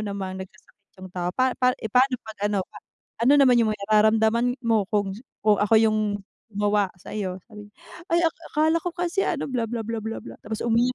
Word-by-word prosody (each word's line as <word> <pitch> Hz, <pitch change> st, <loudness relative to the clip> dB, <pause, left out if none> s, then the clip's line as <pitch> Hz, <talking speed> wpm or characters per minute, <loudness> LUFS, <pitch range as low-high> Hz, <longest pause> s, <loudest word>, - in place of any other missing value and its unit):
namang 195 Hz, -2 st, -4 dB
nagkasakit 200 Hz, +1 st, -13 dB
yung 185 Hz, -, -8 dB
tao 180 Hz, -1 st, -2 dB
pa 255 Hz, 0 st, +2 dB
pa 250 Hz, 0 st, +4 dB
eh 220 Hz, -, -5 dB
paano 255 Hz, +3 st, +4 dB
pag 220 Hz, -1 st, -11 dB
ano 205 Hz, -1 st, 0 dB
pa, -, -, -18 dB, 0.5 s
ano 255 Hz, +4 st, +5 dB
naman 255 Hz, -3 st, +6 dB
yung 225 Hz, -2 st, +3 dB
may -, -, -12 dB
nararamdaman 220 Hz, +3 st, +3 dB
mo 225 Hz, -3 st, +2 dB
kung 205 Hz, -2 st, 0 dB, 0.3 s
kung 210 Hz, -1 st, +4 dB
ako 210 Hz, +2 st, +3 dB
yung, 215 Hz, -1 st, +3 dB, 0.6 s
gumawa 205 Hz, 0 st, +2 dB
sayo." 185 Hz, 0 st, -5 dB
Sabi 210 Hz, -1 st, -11 dB
niya, 205 Hz, -, -24 dB, 0.4 s
"Ay 340 Hz, +1 st, +3 dB, 0.3 s
akala 315 Hz, +2 st, +3 dB
ko 355 Hz, +2 st, -4 dB
kasi 355 Hz, +2 st, -1 dB
ano 320 Hz, -, -1 dB
bla 245 Hz, -3 st, -1 dB
bla 230 Hz, 0 st, -3 dB
bla 230 Hz, +1 st, -4 dB
bla 220 Hz, +1 st, -5 dB
bla," -, -, -10 dB
tapos 220 Hz, 0 st, -4 dB
umiyak 235 Hz, +2 st, +2 dB
220 Hz, 205 wpm, -24 LUFS, 205-250 Hz, 0.6 s, naman